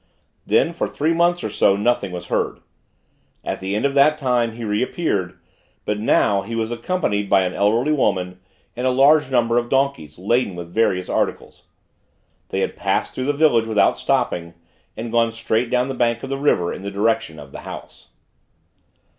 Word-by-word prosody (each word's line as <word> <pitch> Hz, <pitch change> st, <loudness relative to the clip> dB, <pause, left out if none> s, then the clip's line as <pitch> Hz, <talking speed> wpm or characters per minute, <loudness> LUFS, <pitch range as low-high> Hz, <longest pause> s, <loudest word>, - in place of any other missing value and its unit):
Then, -, -, +2 dB
for -, -, -2 dB
three 155 Hz, +3 st, 0 dB
months 175 Hz, +1 st, +2 dB
or 110 Hz, -, -3 dB
so, 100 Hz, -, +3 dB
nothing 105 Hz, -2 st, 0 dB
was 90 Hz, 0 st, -6 dB
heard. -, -, -2 dB, 0.8 s
At -, -, -4 dB
the 95 Hz, +1 st, -3 dB
end 110 Hz, -, 0 dB
of 140 Hz, -, +1 dB
that 145 Hz, +2 st, +4 dB
time, 125 Hz, -5 st, 0 dB
he 120 Hz, +1 st, -8 dB
reappeared; 105 Hz, -, -1 dB, 0.5 s
but 105 Hz, 0 st, -1 dB
now, 100 Hz, -2 st, +2 dB
he 115 Hz, -, -6 dB
was 115 Hz, 0 st, -2 dB
accompanied 115 Hz, -, -1 dB
by 95 Hz, -1 st, +4 dB
an 90 Hz, 0 st, -2 dB
elderly 115 Hz, +8 st, +1 dB
woman, 90 Hz, -10 st, 0 dB, 0.4 s
and 125 Hz, +2 st, -1 dB
a -, -, +4 dB
large 140 Hz, +2 st, +4 dB
number 120 Hz, -2 st, +2 dB
of 120 Hz, 0 st, -5 dB
donkeys, 135 Hz, -, -1 dB
laden 105 Hz, +1 st, 0 dB
with 85 Hz, 0 st, -8 dB
various 95 Hz, -5 st, +1 dB
articles. -, -, -3 dB, 0.8 s
They -, -, -2 dB
had -, -, -2 dB
passed -, -, -1 dB
through 130 Hz, -, -3 dB
the 145 Hz, -, +1 dB
village 140 Hz, -7 st, +3 dB
without 110 Hz, -2 st, +3 dB
stopping, 85 Hz, -1 st, -1 dB, 0.4 s
and 115 Hz, +1 st, -5 dB
gone 115 Hz, 0 st, +2 dB
straight 115 Hz, +1 st, -1 dB
down 125 Hz, 0 st, +1 dB
the 135 Hz, -, -3 dB
bank 120 Hz, -2 st, 0 dB
of 135 Hz, -, -6 dB
the 135 Hz, -, -1 dB
river, 90 Hz, -12 st, +1 dB
in -, -, -8 dB
the 100 Hz, -, -5 dB
direction 105 Hz, -4 st, -1 dB
of 70 Hz, -2 st, -11 dB
the -, -, -8 dB
House. -, -, -10 dB
115 Hz, 185 wpm, -21 LUFS, 100-130 Hz, 0.8 s, that